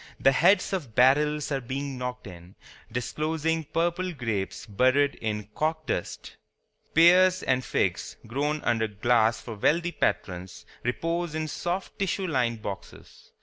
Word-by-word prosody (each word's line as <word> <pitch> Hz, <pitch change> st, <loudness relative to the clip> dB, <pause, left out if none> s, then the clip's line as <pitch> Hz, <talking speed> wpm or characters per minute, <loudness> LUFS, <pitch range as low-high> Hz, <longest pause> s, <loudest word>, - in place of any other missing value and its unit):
The 135 Hz, -, +5 dB
heads 185 Hz, +9 st, +3 dB
of 140 Hz, -, -4 dB
barrels 150 Hz, +4 st, +3 dB
are 135 Hz, -1 st, 0 dB
being 135 Hz, +2 st, -4 dB
knocked 125 Hz, 0 st, -5 dB
in, 90 Hz, -1 st, -12 dB, 0.4 s
disclosing 155 Hz, +6 st, -1 dB
purple 175 Hz, +4 st, -1 dB
grapes 115 Hz, -9 st, -3 dB
buried 130 Hz, +7 st, +2 dB
in 105 Hz, -2 st, -3 dB
corkdust. 155 Hz, -, -3 dB, 0.6 s
Pears 180 Hz, +3 st, +6 dB
and 130 Hz, 0 st, +1 dB
figs, -, -, -1 dB
grown 145 Hz, +6 st, -2 dB
under 115 Hz, -2 st, +1 dB
glass 110 Hz, +1 st, +2 dB
for 115 Hz, -, -7 dB
wealthy 165 Hz, +11 st, +1 dB
patrons, 90 Hz, -, -2 dB, 0.2 s
repose 165 Hz, +6 st, -2 dB
in 155 Hz, 0 st, -2 dB
soft 175 Hz, +5 st, -4 dB
tissue 195 Hz, 0 st, -1 dB
lined 120 Hz, -8 st, -1 dB
boxes. 100 Hz, -1 st, -9 dB
140 Hz, 130 wpm, -27 LUFS, 115-160 Hz, 0.6 s, Pears